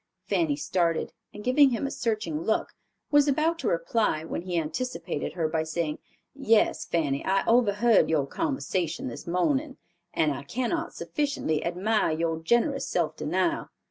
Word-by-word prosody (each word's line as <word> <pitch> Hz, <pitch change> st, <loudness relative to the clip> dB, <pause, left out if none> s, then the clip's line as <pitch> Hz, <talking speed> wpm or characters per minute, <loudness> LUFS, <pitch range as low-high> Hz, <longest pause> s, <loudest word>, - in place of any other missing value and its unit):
Fanny 320 Hz, -4 st, +1 dB
started; 175 Hz, -, 0 dB, 0.2 s
and 210 Hz, -, -9 dB
giving 270 Hz, +3 st, +5 dB
him 245 Hz, +2 st, -2 dB
a 275 Hz, -, -2 dB
searching 215 Hz, -10 st, -2 dB
look, 220 Hz, +6 st, 0 dB, 0.4 s
was 290 Hz, 0 st, +5 dB
about 315 Hz, +4 st, +1 dB
to 265 Hz, -, -2 dB
reply, 170 Hz, 0 st, +1 dB
when 165 Hz, -, -4 dB
he 180 Hz, -1 st, -3 dB
anticipated 170 Hz, -, -3 dB
her 165 Hz, -2 st, 0 dB
by 160 Hz, 0 st, 0 dB
saying, 160 Hz, -1 st, -2 dB, 0.3 s
"Yes, 225 Hz, -6 st, +2 dB
Fanny, 145 Hz, -5 st, 0 dB
I 195 Hz, +1 st, +1 dB
overheard 230 Hz, -1 st, +4 dB
your 155 Hz, -4 st, +2 dB
conversation 185 Hz, -, -2 dB
this 120 Hz, -, -9 dB
morning, 265 Hz, -, 0 dB, 0.3 s
and 155 Hz, -2 st, +1 dB
I 140 Hz, -, -6 dB
cannot 255 Hz, -, -2 dB
sufficiently 275 Hz, -, -1 dB
admire 185 Hz, +1 st, +1 dB
your 165 Hz, 0 st, -1 dB
generous 240 Hz, -, +1 dB
self 160 Hz, -3 st, 0 dB
denial. 185 Hz, -, -1 dB
195 Hz, 150 wpm, -27 LUFS, 160-265 Hz, 0.4 s, giving